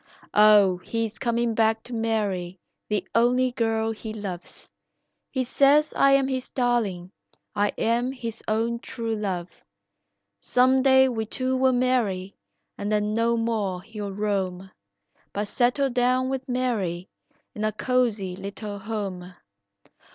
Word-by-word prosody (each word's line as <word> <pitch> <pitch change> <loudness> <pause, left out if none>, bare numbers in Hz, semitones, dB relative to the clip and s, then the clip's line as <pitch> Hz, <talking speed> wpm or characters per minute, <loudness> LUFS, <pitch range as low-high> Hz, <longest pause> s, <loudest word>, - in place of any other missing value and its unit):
Oh, 210 -3 +6
he 230 +5 -2
is 220 0 -7
coming 235 -1 0
back 220 0 +2
to 250 - -9
marry 205 -6 -1 0.3
the 205 -3 -1
only 250 +2 +3
girl 225 -2 0
he 220 0 -6
loves, 190 -5 -7 0.6
He 260 -2 -1
says 285 +4 +3
I 275 0 +5
am 275 -1 +4
his 260 -1 -3
darling, 220 -8 -1 0.4
I 205 0 +2
am 240 +3 +1
his 230 -4 -6
own 230 +2 0
true 230 -2 -4
love; 190 -5 -3 0.9
Some 255 - +3
day 265 0 +6
we 225 -4 -2
two 260 +2 -1
will 260 0 +3
marry 230 -7 0 0.5
and 205 +1 -2
then 210 0 +1
no 230 +1 +2
more 210 -6 -1
he'll 210 -1 -6
roam, 190 -2 -2 0.6
But 205 +1 -2
settle 265 +2 +1
down 255 +1 +2
with 265 0 -4
Mary 210 -9 -1 0.5
in 210 - -5
a 215 - +1
cozy 215 -5 0
little 200 +2 -6
home. 195 -4 -5
225 Hz, 135 wpm, -25 LUFS, 200-250 Hz, 0.9 s, Oh